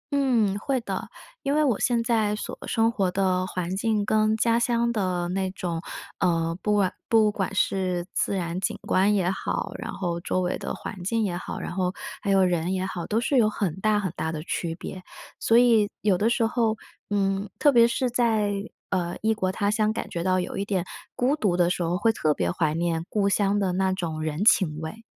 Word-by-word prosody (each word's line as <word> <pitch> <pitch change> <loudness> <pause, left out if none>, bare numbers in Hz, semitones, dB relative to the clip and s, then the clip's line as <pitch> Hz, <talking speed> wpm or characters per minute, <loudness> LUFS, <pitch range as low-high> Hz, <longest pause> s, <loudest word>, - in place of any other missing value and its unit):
嗯， 240 -8 +2
会 260 +3 -1
的， - - -4 0.3
因 280 +1 0
为 305 - +3
我 250 -8 +1
现 235 -2 +1
在 220 -3 +1
所 210 - -6
生 225 -1 +2
活 195 -5 0
的 185 -1 +1
环 180 -1 -3
境 215 0 +1
跟 215 +1 +2
家 230 +1 +2
乡 235 0 +1
的 185 -5 -1
那 190 +1 -1
种 175 -3 -4 0.4
呃， 165 -3 +1
不 210 - +1
管 195 -3 +2
不 220 -2 +4
管 195 -2 -3
是 185 -2 0
自 - - 0
然 175 -1 -2
景 190 - -2
观 200 +3 +2
也 185 -2 +1
好， 190 - -3
然 - - -5
后 175 -2 -2
周 185 +1 -1
围 180 0 -1
的 - - -4
环 200 -5 -7
境 225 +3 +1
也 180 -4 -1
好， - - -6
然 - - -5
后 180 0 -1 0.3
还 - - -3
有 195 -1 +5
人 175 0 +1
也 190 0 -1
好， 180 -3 -5
都 220 +2 +1
是 270 +2 +1
有 220 -3 +5
很 200 -6 -2
大 210 +1 +2
很 190 -4 -2
大 160 - -2
的 155 -1 -5
区 165 -1 -3
别。 185 +2 -8 0.4
所 225 - +4
以 230 -4 +5
有 200 -3 +3
的 215 +5 +2
时 235 -1 +2
候， 225 -1 +1 0.3
嗯， 195 -1 0
特 290 - +5
别 235 -3 +6
是 250 +2 0
在， 225 -4 +1 0.4
呃， 175 -2 -1
异 220 +1 +2
国 190 -4 -1
他 200 +2 0
乡 215 0 +1
感 - - -4
觉 170 - -3
到 185 0 +2
有 180 - -5
一 200 - -1
点 195 -3 0 0.3
孤 265 +5 +1
独 200 -10 +1
的 175 -1 +3
时 180 - -1
候， 170 +2 0
会 225 +4 +3
特 155 -8 +1
别 90 -9 -1
怀 155 - 0
念 165 0 -1
故 200 -2 +1
乡 200 0 +2
的 195 -2 +1
那 190 +1 +1
种 165 -4 -3
人 155 +3 -2
情 185 -8 +4
味。 165 +8 -7
195 Hz, 235 characters per minute, -25 LUFS, 180-220 Hz, 0.4 s, 别